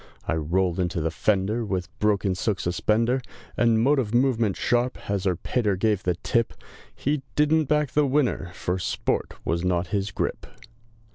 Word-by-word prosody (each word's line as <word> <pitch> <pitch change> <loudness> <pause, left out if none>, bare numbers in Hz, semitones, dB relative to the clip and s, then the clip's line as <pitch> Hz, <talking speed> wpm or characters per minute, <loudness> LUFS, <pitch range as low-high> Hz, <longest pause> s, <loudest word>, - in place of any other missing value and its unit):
I - - +1
rolled 85 +3 0
into 90 0 0
the 80 0 -1
fender, 105 +5 +1
With 95 -5 -2
broken 105 -2 +2
silk 95 +1 -1
suspender, 115 +8 +1 0.3
And 115 -2 +3
motive 125 -3 +2
movement 120 -5 +2
sharp, 120 +2 +1
as 100 -1 -1
Her 95 -2 +2
Pater 105 +2 0
gave 105 0 +1
the 90 -1 0
tip! 115 +6 0 0.4
He 145 +1 -1
didn't 155 +1 +3
back 150 -1 +1
the 150 -1 +3
winner, 130 -9 +1
For 90 +1 -2
sport 85 - -1
was 85 +1 0
not 90 -1 0
his 100 0 0
grip. - - -3
105 Hz, 160 wpm, -25 LUFS, 90-125 Hz, 0.4 s, And